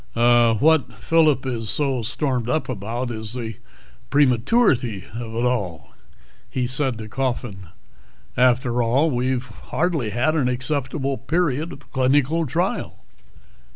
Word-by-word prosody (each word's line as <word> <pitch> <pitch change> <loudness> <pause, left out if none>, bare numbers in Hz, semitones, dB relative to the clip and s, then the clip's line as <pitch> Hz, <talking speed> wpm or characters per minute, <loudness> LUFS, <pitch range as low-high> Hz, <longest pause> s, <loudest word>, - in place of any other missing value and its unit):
"What 120 +5 +4
Phillip 155 -5 +2
is 115 -4 -3
so 135 -3 0
stormed 125 0 -1
up 155 +4 0
about 120 +2 -4
is 110 0 -6
the 115 -4 -5 0.5
prematurity 125 - +2
of 115 -1 -6
it 120 +2 0
all," 90 - -2 0.6
he 125 -1 -1
said 130 -1 0
to 110 -1 -7
Coffin. 120 -6 -3 0.7
"After 125 -1 +3
all, 135 +7 +2
we've 125 0 -1
hardly 150 +3 -2
had 120 +9 +1
an 145 -6 +1
acceptable 135 +1 -2
period 155 +2 0
of 140 - -13
clinical 145 +5 +2
trial." - - -2
125 Hz, 120 wpm, -22 LUFS, 115-140 Hz, 0.7 s, What